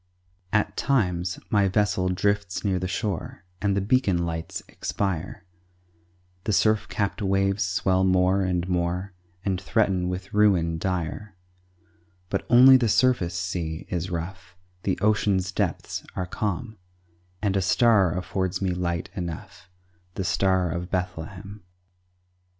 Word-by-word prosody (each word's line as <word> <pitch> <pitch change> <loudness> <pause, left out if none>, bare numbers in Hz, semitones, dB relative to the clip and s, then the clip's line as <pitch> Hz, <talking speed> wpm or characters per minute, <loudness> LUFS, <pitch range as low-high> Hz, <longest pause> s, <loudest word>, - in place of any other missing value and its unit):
At 105 -1 +1
times 90 -9 0
my 100 -2 +4
vessel 95 -2 +1
drifts 100 +1 -1
near 95 -2 +1
the 90 - -2
shore, 95 -2 -4 0.2
And 100 -1 +1
the - - +2
beacon 100 -6 +2
lights 80 -1 -4
expire, 95 0 -3 1.0
The 105 - 0
surf 110 -2 +3
capped 100 +2 -2
waves 100 0 +1
swell 95 0 +1
more 95 +1 +3
and 90 -2 0
more, 90 +2 -1 0.3
And 95 -2 0
threaten 95 -3 +1
with 95 +3 -5
ruin 90 -6 +3
dire; 90 +2 -3 1.0
But 95 - -2
only 130 +2 +9
the 120 -3 +1
surface 100 -7 +2
sea 85 -2 -3
is 90 +1 -2
rough; 90 +1 -6 0.3
The 95 - -1
ocean's 100 -3 +2
depths - - -2
are 90 - -2
calm, 105 +3 -3 0.6
And 100 -1 0
a 95 - +2
star 95 -2 +3
affords 90 0 -2
me 95 -1 0
light 85 -1 -2
enough, 85 -1 -7 0.5
The 95 - -2
Star 95 -3 +1
of 85 +2 -4
Bethlehem. 90 +3 -5
95 Hz, 130 wpm, -25 LUFS, 90-100 Hz, 1.0 s, only